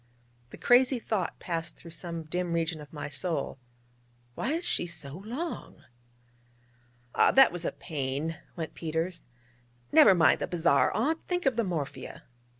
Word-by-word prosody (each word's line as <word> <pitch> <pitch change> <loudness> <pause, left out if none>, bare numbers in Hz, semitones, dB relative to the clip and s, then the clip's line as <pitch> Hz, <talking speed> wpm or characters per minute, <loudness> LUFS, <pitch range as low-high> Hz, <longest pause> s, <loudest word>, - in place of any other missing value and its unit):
The - - -11
crazy 255 +2 +4
thought 215 -6 -2
passed 165 -1 -4
through 170 - -12
some 170 0 -5
dim 175 +2 -2
region 165 -1 -1
of 145 - -12
my 145 -2 -5
soul: 145 -1 -2 0.7
'Why 250 - -2
is 340 +2 -2
she 175 - +2
so 150 -3 -6
long?' 255 - -6 1.3
'Ah, - - +5
that 270 0 +7
was 175 -1 -3
a - - 0
pain!' 145 +2 -4 0.2
went 160 -2 -5
Peters: 165 +2 -3 0.7
'never 300 -11 +8
mind 165 -2 +4
the - - -1
bazaar, 170 -1 +3
aunt 320 +3 +1
think 355 -2 -1
of 270 -3 +3
the 230 - +1
morphia.' 165 -8 -5
170 Hz, 150 wpm, -29 LUFS, 160-230 Hz, 1.3 s, never